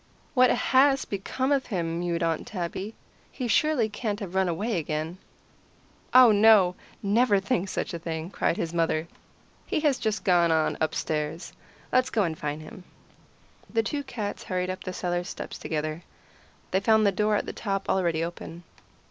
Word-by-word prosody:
"What 255 -2 +5
has 270 +1 +3
become 255 +7 -2
of 275 -2 +1
him?" 170 -6 -2
mewed 170 -1 -1
Aunt 165 -1 -1
Tabby. 190 +2 -5 0.4
"He 255 - -4
surely 270 -1 +2
can't 210 -1 -3
have 195 -5 -6
run 190 -1 +2
away 205 +5 -1
again." 155 +3 -4 0.9
"Oh, 255 -2 +8
no! 205 -3 +6 0.3
Never 205 +1 +3
think 195 -2 -1
such - - -3
a 170 - -4
thing," 165 +1 -5
cried 170 - 0
his 165 0 -3
mother. 165 -1 0 0.6
"He - - 0
has 285 -4 +2
just 215 -1 -1
gone 175 -3 +4
on 160 -1 +2
upstairs. 155 +1 -2 0.4
Let's 255 0 +3
go 215 - +1
and 165 -3 -1
find 150 0 -4
him." 180 - -11 0.9
The 225 -1 +1
two 285 +5 -3
cats 215 -6 -5
hurried 180 0 -1
up 185 - -7
the 185 - -3
cellar 175 -1 -2
steps - - -7
together. 155 +1 -3 0.7
They 190 - +3
found 220 +2 +4
the 200 - +4
door 210 +2 +1
at - - 0
the - - -5
top 195 -2 -3
already 170 -4 +1
open. 170 0 -7
190 Hz, 170 wpm, -27 LUFS, 170-220 Hz, 0.9 s, Oh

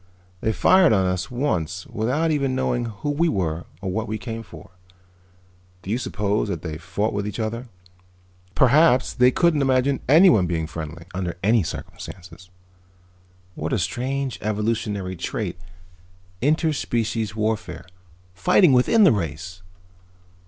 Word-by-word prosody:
They 110 - 0
fired 185 - +5
on 95 -3 +2
us 90 0 -2
once 90 - -2
without 130 +10 -1
even 140 -3 0
knowing 125 -2 0
who 115 +6 -4
we 165 +4 +1
were 85 - -2 0.2
or 95 -2 -3
what 110 +3 -2
we 110 - -3
came 115 0 -6
for. 110 - -13 1.1
Do 95 - -5
you 120 - 0
suppose 105 -3 -1
that 85 -6 -4
they 80 -2 -5
fought 95 +5 -2
with 100 0 -2
each 105 - -5
other? 115 +3 -3 0.9
Perhaps 130 0 +4
they 125 -1 +5
couldn't 160 +2 +2
imagine 135 0 +2
anyone 155 - +6
being 80 -2 -1
friendly, 80 +1 -7
under 90 -2 -3
any 110 +2 +4
circumstances. 90 +2 -8 1.0
What - - -4
a - - +2
strange 135 +1 -2
evolutionary 105 -3 -2
trait, 90 - -4 0.8
inter 155 +4 +2
species 115 -5 -2
warfare. 110 0 -2 0.5
Fighting 135 - +4
within 170 - +4
the 185 - +7
race!" 90 - -4
110 Hz, 140 wpm, -23 LUFS, 95-130 Hz, 1.1 s, the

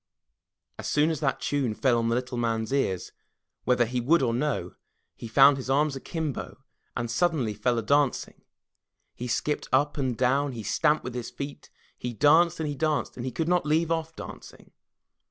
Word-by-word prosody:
As - - -5
soon 150 +2 +2
as 155 - -3
that 135 -3 0
tune 135 -6 -1
fell 120 -1 +2
on 115 0 0
the 115 - +1
little 125 +1 -3
man's 115 -1 -1
ears, 95 -10 -1 0.5
whether 125 -1 +3
he 125 +2 -2
would 155 +5 +3
or 115 -2 +1
no, 145 +4 -1 0.4
he 115 - -9
found 135 +5 +6
his 130 -1 -6
arms 145 +1 +2
akimbo, 155 +1 -4 0.4
and 120 -1 -2
suddenly 140 -6 +1
fell 120 +3 0
a 115 - -1
dancing. 140 +3 +1 0.7
He 125 - -6
skipped 150 +4 -1
up 145 +3 +2
and 130 -4 -1
down, 135 +3 +1
he 115 -2 -6
stamped 155 +6 +1
with 125 - -5
his 125 -1 -5
feet, 140 0 -8 0.3
he 120 0 -4
danced 160 +8 +4
and 160 - -1
he 145 - -2
danced, 150 +1 -1
and 125 +1 -5
he - - -3
could 165 +3 -2
not 180 0 +2
leave 160 +2 +1
off 165 -1 -2
dancing. - - -11
135 Hz, 190 wpm, -27 LUFS, 120-150 Hz, 0.7 s, found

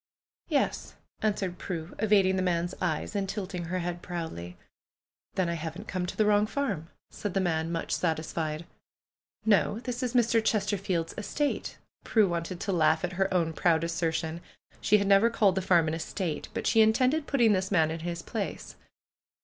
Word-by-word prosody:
"Yes," - - -1 0.3
answered 200 -4 -1
Prue, 170 -2 -5
evading 200 -3 +4
the 190 - +1
man's 175 0 0
eyes 175 +2 -1
and 195 -1 -1
tilting 190 -3 -4
her 180 +2 -2
head 175 -1 -3
proudly. 160 - -6 0.8
"Then 185 -2 +1
I 170 - -1
haven't 170 +5 -6
come 185 -2 -2
to - - -6
the 215 - +3
wrong 210 0 +4
farm," 205 - -2 0.2
said 205 -2 -5
the - - +3
man, 165 -3 0
much 165 -1 -3
satisfied. 160 -1 -1 0.8
"No! 210 0 +3
This 250 0 -4
is 250 -1 -2
Mr. 230 -2 +3
Chesterfield's 195 -6 0
estate." 290 +7 -2 0.3
Prue 220 -3 +3
want 170 0 -2
ed 180 - -5
to 200 - -1
laugh 160 -2 +3
at 180 +1 -2
her 195 +2 0
own 170 -3 +1
proud 165 -1 +2
assertion. 165 0 -1 0.4
She 210 - +4
had 200 - 0
never 200 +3 +5
called 205 -4 +3
the 190 - -1
farm 175 -3 +3
an 155 - -1
estate; 165 0 -3
but - - -4
she 225 - +5
intended 255 +8 +3
putting 235 -6 +4
this 190 -1 0
man 160 -5 +3
in 165 - -4
his 170 +1 -4
place. - - -5
185 Hz, 180 wpm, -28 LUFS, 165-210 Hz, 0.8 s, never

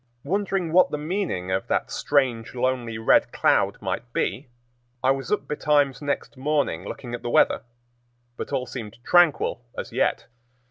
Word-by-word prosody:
Wondering 195 -3 -1
what 185 +1 +6
the 150 - -2
meaning 150 - -2
of 95 +1 -1
that - - -1
strange, 130 -5 0
lonely 120 -3 -1
red 110 - +3
cloud - - +2
might - - -3
be, 130 0 -2 0.5
I 130 - +5
was 135 0 -3
up 210 - 0
betimes 145 -2 +1
next 145 0 -3
morning 135 - 0
looking 120 +3 -7
at 120 - -4
the 120 - -4
weather, - - +3 0.7
but - - -6
all 130 -2 -1
seemed 115 -6 -7
tranquil 155 -8 +3
as - - -5
yet. - - +1
135 Hz, 155 wpm, -24 LUFS, 120-150 Hz, 0.7 s, what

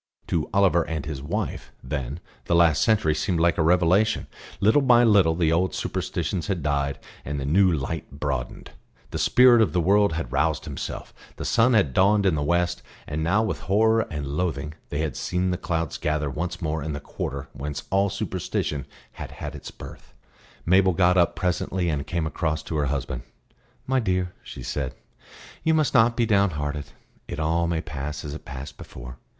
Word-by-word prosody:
To 80 -2 0
Oliver 95 -4 +4
and 80 -2 -3
his 75 -3 -5
wife, 70 - -4
then, 70 +2 -4 0.3
the 85 - +1
last 85 -3 +4
century 105 -8 +3
seemed 85 +2 -1
like 85 +1 +2
a - - +4
revelation; 90 +6 +3 0.3
little 110 +8 +4
by 120 -3 +5
little 100 -8 +5
the 80 -2 +2
old 85 +2 +1
superstitions 90 -1 -2
had 95 -6 -2
died, 70 -1 0 0.3
and 70 +1 -4
the 70 - -3
new 90 +6 +4
light 80 +1 -3
broadened; 65 -3 -4 0.4
the - - -3
Spirit 125 -2 +6
of 110 - +2
the 90 - +2
World 100 +2 +3
had 80 -6 -4
roused 75 +2 0
Himself, - - -6 0.2
the - - -6
sun 115 +1 +3
had 80 - +3
dawned 100 +4 +4
in 95 - +4
the 75 - -1
west; 85 +3 +1 0.2
and 75 +2 -3
now 100 +7 +2
with 110 - -2
horror 110 +3 +2
and 75 -4 -4
loathing 75 0 -2 0.2
they 75 - -2
had 80 -5 -2
seen 90 +1 -1
the - - 0
clouds 85 -3 -2
gather 75 -1 -1
once 85 +4 -4
more 80 0 -1
in 75 +1 -3
the 70 - -4
quarter 70 -1 -5
whence 70 +1 -5
all 100 +1 +3
superstition 70 -6 -3 0.2
had - - -8
had - - -7
its - - -8
birth. - - -12 0.5
Mabel 95 +1 +4
got 90 +1 +3
up 85 -2 +3
presently 90 0 -1
and 75 -3 -2
came 85 -3 -1
across 80 0 -2
to 80 - -5
her 75 -1 +1
husband. 70 -2 -3 0.6
"My 130 0 +1
dear," 90 -5 -1
she - - -9
said, 70 -3 -3 0.7
"you 160 0 +3
must 155 -2 +2
not 120 -2 +4
be 120 - +3
downhearted. 75 -9 0 0.4
It - - -5
all 85 +2 +1
may 85 -1 -1
pass 75 -2 -5
as 75 - -5
it 80 - -9
passed 65 +1 -8
before. 60 +1 -10
85 Hz, 190 wpm, -25 LUFS, 75-95 Hz, 0.7 s, Spirit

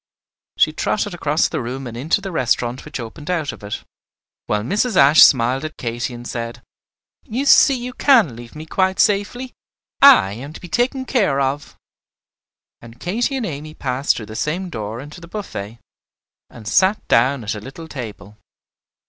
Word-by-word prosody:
She - - +3
trotted - - -1
across - - +1
the - - -3
room 130 +3 -5
and 120 -2 -7
into 150 +11 0
the 195 -1 -6
restaurant 125 -4 -1
which 155 -3 -6
opened 135 +7 -8
out 165 -5 -1
of - - -13
it, 100 - -5 0.6
while 105 0 0
Mrs. 210 - 0
Ashe 140 +3 +7
smiled 130 +2 +5
at 155 0 -6
Katy 120 +1 -3
and 120 0 -8
said, 115 -1 -6 0.6
"You 255 +6 -3
see 275 0 +6
you 250 0 -5
can 235 - +4
leave 120 +2 -12
me 155 +1 -8
quite 190 +3 0
safely; 220 +5 +1 0.5
I 100 - +7
am 135 +7 -8
to - - -10
be 175 - -11
taken 260 +5 0
care 195 - +1
of." 140 +1 -2 1.1
And 115 0 -14
Katy 235 - -1
and 245 - -2
Amy 155 -2 -6
passed 130 +1 0
through 110 - -6
the 110 +1 -10
same 175 +8 -2
door 110 -2 -5
into 150 +5 -11
the 170 - -11
buffet, 120 - -7 0.7
and 110 -3 -12
sat 190 - +2
down 125 +2 +3
at 105 - -2
a 105 - -6
little 135 +8 -10
table. 105 - -8
140 Hz, 175 wpm, -20 LUFS, 120-190 Hz, 1.1 s, Ashe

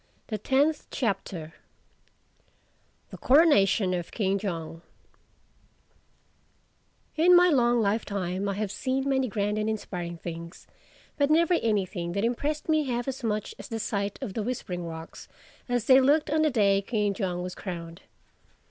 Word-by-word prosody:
THE 215 -2 -3
TENTH 285 +7 +1
CHAPTER 190 - -3 1.6
THE - - -9
CORONATION 230 - +4
OF 175 -2 -3
KING 200 -2 0
JONG 165 -4 -5 2.3
IN 350 +3 +6
my 355 +1 +6
long 240 -5 +3
lifetime 200 -2 -1
I 200 - -2
have 205 -1 -3
seen 265 +5 -2
many 265 -1 +1
grand 210 -1 -1
and 215 +1 -1
inspiring 175 -5 -4
things, 170 +1 -8 0.5
but 285 0 +2
never 335 +3 +4
anything 195 - -1
that 200 +3 0
impressed 290 +6 -2
me 310 -2 +2
half 245 -1 -2
as 265 -1 -4
much 215 - -2
as - - -8
the 225 -4 -4
sight 200 -2 -2
of 195 - -5
the 220 - -2
Whispering 195 -7 -4
Rocks 160 0 -9 0.4
as 245 -2 0
they 260 +1 +7
looked 295 +3 +3
on 310 0 +2
the 310 - +3
day 200 -6 +3
King 205 -1 -1
Jong 180 -3 -3
was 180 0 -5
crowned. 170 -3 -7
210 Hz, 150 wpm, -27 LUFS, 185-265 Hz, 2.3 s, they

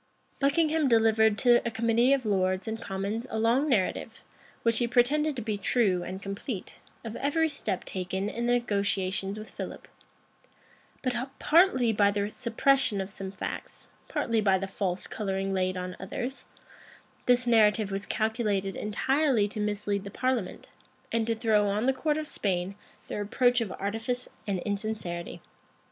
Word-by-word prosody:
Buckingham 305 +2 +2
delivered 220 -2 +4
to 240 +1 +5
a 235 - -1
committee 230 +2 +2
of 275 -3 +2
lords 185 -1 +1
and 225 +1 -3
commons 205 +4 -3
a 220 - -3
long 240 +7 +2
narrative, 210 -8 0 0.4
which 230 -1 +3
he 240 - +1
pretended 280 +5 +2
to 240 - -4
be 210 -2 -2
true 195 -4 +2
and 185 +2 -5
complete, 200 +1 -5 0.3
of 225 0 -5
every 320 +3 +1
step 215 -10 -3
taken 190 +1 -3
in 235 +3 -2
the 245 - +3
negotiations 200 -3 0
with 215 0 -8
Philip: - - -7 1.2
but, 255 -2 0 0.2
partly 295 -8 +4
by 205 -1 +4
the 205 +1 -1
suppression 235 -1 +2
of 190 +1 -4
some 195 -1 -5
facts, 195 - -6 0.2
partly 230 -2 0
by 195 -2 +4
the 190 - -3
false 190 -1 -3
coloring 195 -2 -2
laid 185 -1 0
on 180 0 -4
others, 260 +3 -5 0.8
this 245 0 +4
narrative 215 -3 +4
was 195 +1 -3
calculated 215 -3 0
entirely 260 +1 +1
to 215 - -6
mislead 205 -1 -1
the 200 - -7
parliament, 250 -2 -2 0.4
and 225 -1 0
to 230 - +1
throw 220 -2 +2
on 205 +3 0
the 265 - +3
court 300 +3 0
of 310 -1 -3
Spain 185 -5 -1 0.3
the - - -4
reproach 245 +4 +2
of 215 -5 -3
artifice 225 +5 -3 0.2
and 200 -2 0
insincerity. 200 -4 -4
220 Hz, 155 wpm, -28 LUFS, 195-245 Hz, 1.2 s, to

